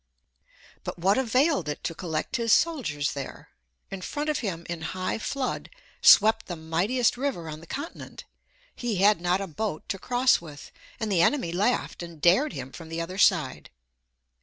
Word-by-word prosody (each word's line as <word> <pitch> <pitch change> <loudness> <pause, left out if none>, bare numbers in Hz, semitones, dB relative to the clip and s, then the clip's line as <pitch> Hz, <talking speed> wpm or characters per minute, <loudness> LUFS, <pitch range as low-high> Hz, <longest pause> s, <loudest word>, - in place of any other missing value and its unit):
But - - -5
what 195 +7 +3
availed 255 - +2
it 150 - -5
to 165 - -2
collect 160 -3 -3
his 230 -1 0
soldiers 255 - +2
there? 140 -2 -8 0.4
In 195 -1 -5
front 295 +9 -2
of 300 - -2
him, 170 -7 -4
in 170 -1 -5 0.2
high 185 +3 -2
flood, 260 +3 -3 0.3
swept 220 +2 +6
the 175 - -4
mightiest 180 +11 0
river 255 -11 -2
on 155 -1 -6
the 165 - -14
continent; 285 - -7 0.5
he 240 -3 -2
had 200 0 +4
not 180 +2 +1
a - - -2
boat 190 -1 -4
to 195 - -2
cross 250 0 +3
with, 150 -4 -11 0.3
and 220 -3 -2
the 175 -4 +3
enemy 175 -3 +2
laughed 200 +5 0
and 170 -2 -9
dared 220 - +4
him 130 - -6
from 165 +1 -10
the 165 +1 -4
other 180 +3 -4
side. - - +2
190 Hz, 175 wpm, -26 LUFS, 165-245 Hz, 0.5 s, swept